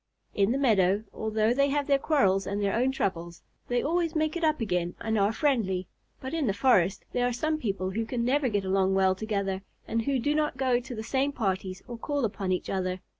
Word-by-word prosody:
In 200 +2 +2
the 260 - +1
meadow, 205 -6 +3
although 220 +1 +1
they 280 +2 +2
have 290 +1 0
their 275 -1 +3
quarrels 195 - +2
and 200 +1 -2
their 200 -1 0
own 255 +3 +2
troubles, 170 -9 -3 0.2
they 245 0 0
always 335 +2 0
make 310 +1 0
it 345 - -3
up 310 -1 +2
again 180 -6 -1
and 225 -1 -1
are 200 +1 +3
friendly, 220 -9 0 0.3
but 260 +2 -6
in 320 -5 0
the 200 - 0
forest 200 -6 +2
there 245 0 +1
are - - 0
some 310 +6 -1
people 195 -7 -2
who 225 +4 -1
can 235 -1 -1
never 270 +1 +2
get 205 -3 -1
along 190 0 +2
well 190 -1 +4
together, 195 -1 -2 0.3
and 230 - 0
who 275 -1 +1
do 290 +5 0
not 300 -3 0
go 255 -2 +2
to 245 0 -8
the 220 - -5
same 270 +4 0
parties 190 -6 -2
or 240 -1 -7
call 285 0 -1
upon 195 -3 -3
each 180 - -1
other. 185 -1 -2
225 Hz, 225 wpm, -28 LUFS, 195-270 Hz, 0.3 s, well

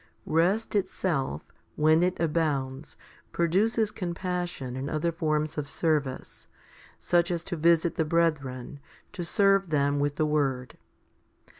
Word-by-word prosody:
Rest 180 +8 +1
itself, 160 - -1 0.3
when 155 +2 +4
it 180 +1 0
abounds, 150 -4 -1 0.3
produces 210 +6 +1
com 175 -5 -4
passion 175 -8 -4
and 135 +2 -4
other 155 +2 0
forms 155 -2 -1
of 145 - -5
service, 150 -5 -2 0.5
such 175 -1 +1
as 170 -2 -2
to 175 - -4
visit 165 +1 +2
the 160 - +2
brethren, 145 -5 -1 0.3
to 185 -4 -4
serve 195 +1 +3
them 145 -1 +1
with 145 0 0
the 155 - +1
word. 135 -4 -1
160 Hz, 130 wpm, -27 LUFS, 145-175 Hz, 0.5 s, when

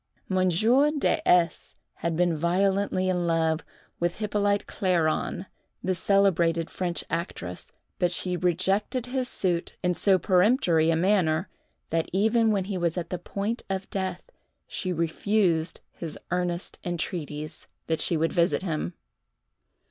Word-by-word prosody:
Monsieur 195 - +3
De 300 -2 +1
S. 175 -2 +2 0.2
had 170 -1 -2
been 175 0 +2
violently 185 +3 +1
in 180 -2 0
love 160 -1 +1 0.4
with 175 0 -1
Hippolyte 205 -1 0
Clairon, 180 -1 0 0.4
the 185 - +1
celebrated 170 -4 +2
French 175 -2 -2
actress, 130 - -5 0.3
but 175 -1 +2
she 180 0 +2
rejected 190 - 0
his 255 0 -1
suit, 175 -3 -1
in 180 0 +2
so 190 +2 +3
peremptory 180 - +3
a 165 - +3
manner, 175 -1 +2 0.4
that 165 0 0
even 220 +4 +3
when 200 -3 +1
he 190 -1 -3
was 170 0 0
at 170 -1 -4
the 180 - -2
point 205 +6 -3
of 190 0 -3
death, 190 - -4 0.3
she 185 - -4
refused 170 0 0
his 165 -3 -7
earnest 180 0 -2
entreaties, 155 -4 -4 0.2
that 160 -1 -1
she 170 - +2
would 165 +1 0
visit 175 +1 +2
him. 170 0 -3
180 Hz, 135 wpm, -26 LUFS, 165-195 Hz, 0.4 s, Monsieur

